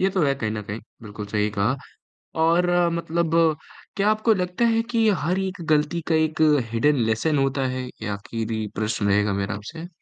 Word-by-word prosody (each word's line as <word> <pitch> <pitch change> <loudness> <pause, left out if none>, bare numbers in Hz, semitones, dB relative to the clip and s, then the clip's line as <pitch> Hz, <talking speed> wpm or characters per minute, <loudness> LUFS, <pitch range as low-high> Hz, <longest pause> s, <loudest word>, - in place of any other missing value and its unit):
ये 190 - +3
तो 185 -3 0
है 140 -1 +2
कहीं 110 -5 -3
न 105 -1 -4
कहीं 105 +3 -6 0.2
बिल्कुल 105 -1 -7
सही 105 +1 0
कहा। 105 +5 0 0.7
और 170 +2 +4 0.3
मतलब 170 0 -1 0.6
क्या 200 +2 +2
आपको 215 +1 +3
लगता 180 +4 0
है 225 - +3
कि 225 -2 +3 0.2
हर 180 +4 +1
एक 190 -2 -3
ग़लती 155 +3 +2
का 165 - +2
एक 160 0 +1 0.3
हिडन 145 +6 +3
लेसन 125 +8 +1
होता 135 0 +1
है? 130 0 -3 0.2
ये 110 - -4
आख़िरी 110 +2 -3
प्रश्न 110 -1 -1
रहेगा 100 0 +2
मेरा 100 +1 -2
आपसे। 160 +12 -8
140 Hz, 185 wpm, -24 LUFS, 110-170 Hz, 0.7 s, और